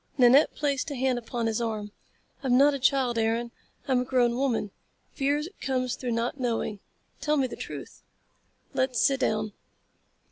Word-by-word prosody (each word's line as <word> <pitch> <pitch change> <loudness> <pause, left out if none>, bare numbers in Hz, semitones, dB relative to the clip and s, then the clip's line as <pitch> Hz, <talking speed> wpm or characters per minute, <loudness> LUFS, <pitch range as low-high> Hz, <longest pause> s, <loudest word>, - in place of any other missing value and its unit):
Nanette 260 +3 +6
placed 285 -2 -1
a 285 - -4
hand 255 -1 +1
upon 235 0 -3
his 225 +1 0
arm. 215 -3 -3 0.5
"I'm 250 -2 +3
not 285 +2 +6
a 280 - -3
child, 255 -3 +2
Aaron. 230 +1 0 0.4
I'm 260 -2 +3
a - - 0
grown 245 -2 +2
woman. 240 -6 0 0.4
Fear 285 +2 0 0.2
comes 255 -2 -1
through 245 -2 -3
not 235 +4 -2
knowing. 230 -4 -1 0.4
Tell 300 0 +1
me 270 - +2
the 250 - -5
truth." - - -8 0.7
"Let's 260 -3 0
sit 270 +6 +3
down." 215 -3 0
250 Hz, 165 wpm, -27 LUFS, 230-270 Hz, 0.7 s, Nanette